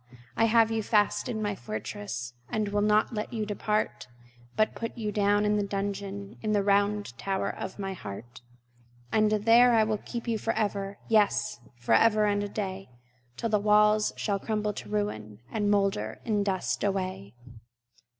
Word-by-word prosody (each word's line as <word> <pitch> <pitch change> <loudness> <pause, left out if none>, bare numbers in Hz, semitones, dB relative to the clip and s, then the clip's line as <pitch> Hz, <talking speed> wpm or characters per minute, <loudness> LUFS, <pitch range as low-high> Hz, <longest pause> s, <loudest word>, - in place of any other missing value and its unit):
I 225 - +3
have 225 0 +4
you 225 0 0
fast 210 +4 +1
in 220 -3 -2
my 205 -1 0
fortress, 120 - -6 0.2
And 215 -2 -1
will 205 0 0
not 210 +3 +3
let 210 -1 -3
you 220 -2 -2
depart, 210 +1 -2 0.5
But 215 0 +2
put 230 +1 -6
you 215 -2 -2
down 205 0 +2
into 210 0 +2
the 200 - -3
dungeon 200 0 -4
In 215 -1 0
the 205 -1 +2
round 205 - +1
tower 195 -1 -1
of 190 - -7
my 195 -1 -3
heart. 120 - -9 0.7
And 215 -1 +3
there 225 +2 +5
will 215 - 0
I - - -17
keep 235 0 -5
you 225 -2 0
forever, 205 -3 -2
Yes, 215 - +2 0.2
forever 215 - +3
and 205 0 +1
a 205 - -4
day, 195 -2 -5 0.5
Till 230 - -2
the 210 -1 +2
walls 210 +1 +4
shall 200 -2 -1
crumble 210 0 -1
to - - -8
ruin, 110 - -3
And 210 -2 0
moulder 195 - 0
in 210 -2 +1
dust 190 -2 -1
away! 185 - -2
205 Hz, 170 wpm, -28 LUFS, 195-215 Hz, 0.7 s, there